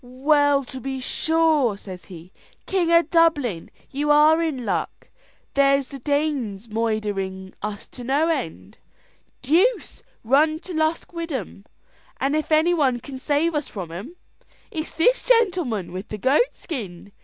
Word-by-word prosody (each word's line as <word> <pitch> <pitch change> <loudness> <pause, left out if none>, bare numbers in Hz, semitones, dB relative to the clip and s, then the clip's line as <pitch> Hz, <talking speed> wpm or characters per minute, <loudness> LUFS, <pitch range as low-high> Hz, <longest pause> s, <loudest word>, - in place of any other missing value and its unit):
"Well, 280 +3 +2
to 260 +1 -9
be 265 +1 -4
sure!" 310 -5 +1
says 185 -4 -10
he, 175 0 -12 0.3
"King 355 -3 0
of 335 -1 +4
Dublin, 295 - +2 0.2
you 290 +2 -2
are 305 +2 +6
in 285 -7 -2
luck. - - -3 0.4
There's 275 -1 +3
the 275 - -8
Danes 275 -7 -1
moidhering 205 -4 -2
us 210 -1 -5
to 250 - -10
no 280 +6 +1
end. 160 - -4 0.6
Deuce 365 - +1 0.2
run 295 +7 +3
to 370 - -8
Lusk 315 +2 -1
wid 335 -1 -5
'em! 205 - -6 0.5
and 275 +2 +1
if 310 +1 -2
any 315 +3 +4
one 270 -7 +2
can 265 +2 -9
save 300 +4 +1
us 295 -2 -2
from 180 -5 -7
'em, 205 - -8 0.6
it 315 -1 -3
is - - -12
this - - +3
gentleman 360 - +1
with 185 +4 -6
the 215 - -6
goat 275 - +2
skin. 200 - -7
275 Hz, 155 wpm, -23 LUFS, 215-320 Hz, 0.6 s, are